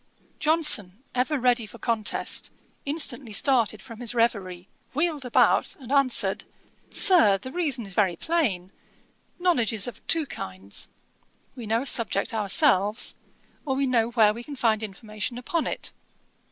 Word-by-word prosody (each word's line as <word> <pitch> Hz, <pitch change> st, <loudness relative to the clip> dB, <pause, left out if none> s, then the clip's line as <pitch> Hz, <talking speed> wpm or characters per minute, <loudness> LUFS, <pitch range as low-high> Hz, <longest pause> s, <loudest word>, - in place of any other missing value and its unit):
Johnson, 295 Hz, -, +1 dB
ever 255 Hz, +4 st, 0 dB
ready 245 Hz, -3 st, +1 dB
for 235 Hz, -, -12 dB
contest, 225 Hz, -2 st, -2 dB, 0.4 s
instantly 280 Hz, -5 st, 0 dB
started 220 Hz, -3 st, +2 dB
from 230 Hz, -3 st, -11 dB
his 245 Hz, -1 st, -2 dB
reverie, 195 Hz, -6 st, -1 dB, 0.3 s
wheeled 305 Hz, -3 st, 0 dB
about, 250 Hz, -, +3 dB
and 260 Hz, -3 st, -11 dB
answered, 275 Hz, -3 st, +2 dB, 0.5 s
'Sir, 225 Hz, -, +5 dB
the 255 Hz, +6 st, -9 dB
reason 285 Hz, -8 st, -1 dB
is 195 Hz, -, -6 dB
very 190 Hz, -3 st, +2 dB
plain. 200 Hz, -, -1 dB, 0.7 s
Knowledge 335 Hz, -, +1 dB
is 210 Hz, -1 st, +1 dB
of 245 Hz, -, -9 dB
two 325 Hz, -2 st, +3 dB
kinds. 95 Hz, -, -7 dB, 0.7 s
We 240 Hz, -4 st, -8 dB
know 225 Hz, +3 st, +1 dB
a -, -, -8 dB
subject 225 Hz, -5 st, +1 dB
ourselves, 205 Hz, 0 st, +3 dB, 0.5 s
or 270 Hz, -3 st, -2 dB
we 275 Hz, +1 st, +1 dB
know 235 Hz, -3 st, +1 dB
where 220 Hz, -3 st, +4 dB
we 235 Hz, -, -7 dB
can 285 Hz, +3 st, -8 dB
find 225 Hz, -4 st, +1 dB
information 215 Hz, +3 st, -5 dB
upon 310 Hz, +7 st, -2 dB
it. -, -, -3 dB
235 Hz, 145 wpm, -25 LUFS, 210-275 Hz, 0.7 s, Sir